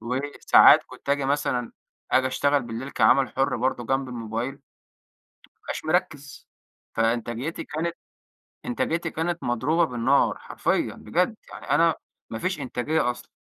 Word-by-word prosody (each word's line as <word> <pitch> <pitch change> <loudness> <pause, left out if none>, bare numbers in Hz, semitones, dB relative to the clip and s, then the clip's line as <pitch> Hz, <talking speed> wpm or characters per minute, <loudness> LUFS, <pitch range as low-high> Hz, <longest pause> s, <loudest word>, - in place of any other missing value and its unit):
وساعات 130 +5 +5
كنت - - -14
آجي 140 -1 +1
مثلًا 135 -4 -1 0.4
آجي 130 0 +3
أشتغل 140 +2 +1
بالليل 120 +3 -6
كعمل 130 +3 +4
حر 135 -2 0
برضو 120 0 -1
جنب 135 +2 -1
الموبايل 115 +1 -4
ما 140 - -24 1.0
أبقاش - - -6
مركز، 155 -4 -2 0.4
فإنتاجيتي 120 +7 -1
كانت 165 +3 -3 0.7
إنتاجيتي 170 -9 -1
كانت 170 +1 -2
مضروبة 135 +8 +1
بالنار 125 0 +2
حرفيًّا - - -1
بجد، - - -1 0.2
يعني - - -10
أنا - - +4 0.3
ما 110 - -5
فيش 185 +1 -2
إنتاجية 130 +1 0
أصلًا، 120 - -13
135 Hz, 130 wpm, -25 LUFS, 120-155 Hz, 1.0 s, وساعات